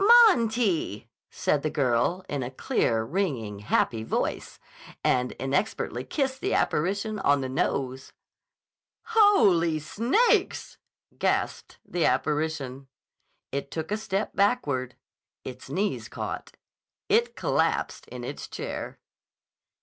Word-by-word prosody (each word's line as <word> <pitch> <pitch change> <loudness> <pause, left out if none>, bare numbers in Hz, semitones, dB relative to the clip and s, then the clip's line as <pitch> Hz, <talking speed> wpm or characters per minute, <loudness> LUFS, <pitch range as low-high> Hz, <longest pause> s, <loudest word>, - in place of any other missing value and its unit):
"Monty!" 220 - +1 0.2
said 145 - 0
the 155 - -1
girl 140 +5 +1
in 145 -2 -2
a 125 - -3
clear, 115 -3 0
ringing, 120 - -2
happy 110 +2 +1
voice, 110 - -2 0.5
and 125 0 +2
inexpertly 135 +11 -1
kissed 265 -2 -2
the - - 0
apparition 200 +6 0
on 145 -6 +3
the 130 - -2
nose. 130 0 -2 1.0
"Holy 200 - +5
Snakes!" 235 - +1 0.4
gasped - - -1
the 175 -2 -1
apparition. 140 -1 0 0.6
It 140 0 -3
took 160 +4 -5
a - - +2
step 200 -1 -2
backward. 145 - +1 0.5
Its 130 0 -9
knees 195 +9 -1
caught. - - -6 0.5
It 455 +3 +2
collapsed - - 0
in - - -8
its - - -6
chair. - - -5
155 Hz, 110 wpm, -27 LUFS, 130-210 Hz, 1.0 s, Holy